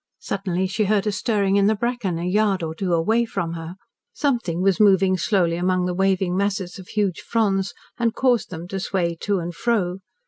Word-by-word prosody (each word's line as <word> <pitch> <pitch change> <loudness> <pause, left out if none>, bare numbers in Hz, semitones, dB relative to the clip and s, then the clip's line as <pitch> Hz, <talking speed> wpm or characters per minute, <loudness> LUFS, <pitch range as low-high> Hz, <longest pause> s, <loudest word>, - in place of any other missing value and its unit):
Suddenly 190 -2 -2
she 195 +3 0
heard 205 0 +1
a 210 - +1
stirring 200 -2 +1
in 200 0 +4
the 220 - +3
bracken 230 -6 -2
a 170 - -3
yard 195 -1 +1
or 160 0 -3
two 180 +2 -3
away 215 +8 +2
from 170 -7 -3
her. 165 +1 -7 0.4
Something 230 - -1
was 195 -2 +2
moving 195 -2 +5
slowly 175 -2 +1
among 180 0 +1
the 180 - -1
waving 190 -1 +1
masses 195 -1 -1
of 185 - -11
huge 205 -4 -1
fronds 195 -4 0 0.2
and 230 -1 +1
caused 250 -3 +2
them 170 -1 -7
to 195 - -3
sway 175 -3 -1
to 205 -1 0
and 175 -1 -4
fro. 195 -4 0
195 Hz, 200 wpm, -23 LUFS, 180-210 Hz, 0.4 s, moving